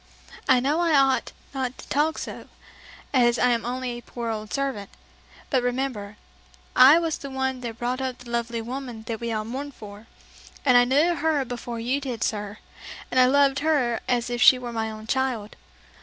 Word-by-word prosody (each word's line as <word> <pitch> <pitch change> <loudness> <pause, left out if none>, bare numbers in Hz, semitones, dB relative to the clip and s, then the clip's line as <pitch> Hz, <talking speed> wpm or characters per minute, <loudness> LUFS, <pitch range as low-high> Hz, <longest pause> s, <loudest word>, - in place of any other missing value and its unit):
I 260 -1 +6
know 285 +6 +1
I 335 -3 +3
ought 270 -1 +2 0.2
not 260 -2 -3
to - - -12
talk 305 +3 +1
so, - - -7 0.7
as 240 -2 +4
I'm 240 -2 +2
only 250 +1 -3
a 240 0 -6
poor 235 -1 -5
old 215 -1 -5
servant; 270 -8 -2 0.6
but 260 - +3
remember, 245 -5 -3 0.6
I 265 +5 +9
was 330 -2 -1
the 280 - -7
one 265 -1 -2
that 230 -2 -6
brought 250 +2 -2
up 260 -1 -3
the 245 -1 -12
lovely 235 -1 -2
woman 245 -2 -6
that 225 0 -5
we 235 -1 -3
all 215 -1 -2
mourn 270 +5 -5
for, 210 -3 -12 0.6
and 255 -3 +5
I 245 0 +7
knew 295 +7 +3
her 310 -3 0
before 240 -1 -6
you 255 +5 -1
did, 245 -5 -3
sir, 210 -1 -3 0.5
and 255 - +2
I 250 - +7
loved 280 +1 +3
her 280 -7 +1
as 245 -1 0
if 240 0 -2
she 255 - +8
were 245 -1 -6
my 220 -1 -2
own 215 0 -8
child. 245 -4 -1
250 Hz, 190 wpm, -25 LUFS, 230-270 Hz, 0.7 s, I